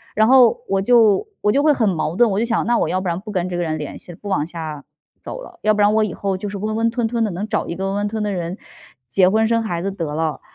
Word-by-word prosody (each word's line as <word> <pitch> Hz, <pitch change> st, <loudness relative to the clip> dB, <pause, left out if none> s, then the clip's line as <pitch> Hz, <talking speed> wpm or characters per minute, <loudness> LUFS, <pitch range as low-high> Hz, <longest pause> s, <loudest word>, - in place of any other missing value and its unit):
然 215 Hz, +1 st, +4 dB
后 250 Hz, -2 st, +5 dB
我 195 Hz, 0 st, +1 dB
就 230 Hz, -, +4 dB
我 210 Hz, -, +3 dB
就 275 Hz, -, +2 dB
会 305 Hz, -, +5 dB
很 230 Hz, -6 st, +1 dB
矛 165 Hz, -2 st, -2 dB
盾， 240 Hz, +4 st, +5 dB
我 195 Hz, -, 0 dB
就 230 Hz, -, +1 dB
想： 230 Hz, -1 st, 0 dB
“那 240 Hz, -, +3 dB
我 -, -, 0 dB
要 185 Hz, -, 0 dB
不 185 Hz, -, -4 dB
然 170 Hz, +1 st, -2 dB
不 210 Hz, +2 st, -8 dB
跟 180 Hz, -3 st, -1 dB
这 180 Hz, -, -4 dB
个 -, -, -1 dB
人 155 Hz, -2 st, -2 dB
联 150 Hz, -2 st, -6 dB
系 -, -, -9 dB
了， -, -, -14 dB
不 205 Hz, -, -6 dB
往 190 Hz, -6 st, 0 dB
下 160 Hz, -4 st, -6 dB, 0.4 s
走 -, -, -7 dB
了。” 350 Hz, -, -14 dB
要 215 Hz, -, +4 dB
不 210 Hz, -, +1 dB
然 205 Hz, +1 st, +4 dB
我 220 Hz, 0 st, +3 dB
以 215 Hz, -, -2 dB
后 195 Hz, -1 st, -2 dB
就 205 Hz, +2 st, -5 dB
是 200 Hz, -, -5 dB
温 215 Hz, +2 st, -3 dB
温 225 Hz, +1 st, +2 dB
吞 235 Hz, 0 st, -1 dB
吞 230 Hz, 0 st, -1 dB
的， 215 Hz, -, 0 dB
能 190 Hz, +5 st, -4 dB
找 -, -, -1 dB
一 170 Hz, -, -4 dB
个 190 Hz, +2 st, -3 dB
温 195 Hz, -, -2 dB
温 205 Hz, 0 st, 0 dB
吞 215 Hz, 0 st, -3 dB
吞 205 Hz, -1 st, -1 dB
的 185 Hz, -, -2 dB
人 170 Hz, +2 st, -4 dB, 0.5 s
结 180 Hz, +8 st, +4 dB
婚、 220 Hz, +3 st, +2 dB
生 230 Hz, 0 st, +2 dB
孩 175 Hz, -6 st, -3 dB
子 195 Hz, -, -1 dB
得 165 Hz, -6 st, -4 dB
了。 160 Hz, -1 st, -2 dB
205 Hz, 345 characters per minute, -20 LUFS, 175-225 Hz, 0.5 s, 后